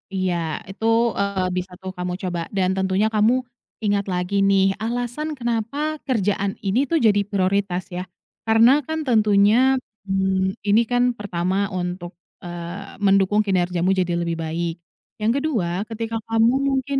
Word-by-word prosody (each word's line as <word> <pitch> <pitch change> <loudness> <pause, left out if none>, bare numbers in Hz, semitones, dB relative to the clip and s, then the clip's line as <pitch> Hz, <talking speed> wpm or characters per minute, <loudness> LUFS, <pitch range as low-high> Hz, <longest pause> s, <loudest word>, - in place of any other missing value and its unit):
Iya, 185 -2 0 0.4
itu, 210 +3 -6 0.3
eee, 200 -2 0
bisa 180 0 -3
tuh 190 0 -5
kamu 180 0 -3
coba. 175 -2 -2 0.2
Dan 185 -2 +2
tentunya 190 +2 +1
kamu 215 +2 +3 0.5
ingat 205 -1 +1
lagi 180 +2 -2
nih, 195 0 +4
alasan 245 +6 -3
kenapa 250 +6 -2
kerjaan 200 -5 0
ini 240 +9 +1
tuh 335 - +2
jadi 205 -2 +5
prioritas 195 -2 0
ya. 180 +1 -5 0.4
Karena 230 +5 +6
kan 315 0 -2
tentunya, 215 +3 +4 0.3
mmm, 190 0 0
ini 205 +3 +5
kan 245 0 +3
pertama 190 0 -1
untuk, 180 -1 -4 0.3
eee, 175 +3 -7
mendukung 195 +1 +4
kinerjamu 180 -2 +1
jadi 185 -2 +1
lebih 170 -1 -2
baik. 165 +1 -2 0.4
Yang 215 +1 +2
kedua, 195 - -1
ketika 225 0 -4
kamu 225 +1 +3 0.2
mungkin 270 0 0
200 Hz, 140 wpm, -22 LUFS, 185-225 Hz, 0.5 s, Karena